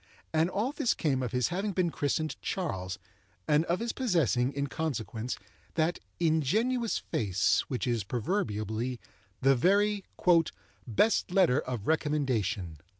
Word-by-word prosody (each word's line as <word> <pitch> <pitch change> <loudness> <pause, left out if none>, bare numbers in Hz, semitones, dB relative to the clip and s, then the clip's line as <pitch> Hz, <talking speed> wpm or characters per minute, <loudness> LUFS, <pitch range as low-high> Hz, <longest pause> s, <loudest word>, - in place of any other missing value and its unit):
And 160 +2 +3
all 215 +7 -1
this 250 - +1
came 140 -5 0
of 125 -4 -2
his 125 0 +1
having 195 +3 -2
been 180 -2 +1
christened 155 +2 -1
Charles, 95 - -3 0.5
and 150 +2 +3
of 175 +1 0
his 235 0 -2
possessing, 160 - +1
in 140 0 -2
consequence, 125 -5 -3 0.4
that 165 +2 +1 0.2
ingenuous 210 - +1
face 95 -4 +1
which 125 - -2
is 120 -4 0
proverbially 115 - -2 0.4
the 135 +1 +5
very 200 +7 +3 0.8
"best 195 - +2
letter 180 -8 +4
of 120 -5 -4
recommendation." 125 - 0
150 Hz, 130 wpm, -30 LUFS, 120-185 Hz, 0.8 s, the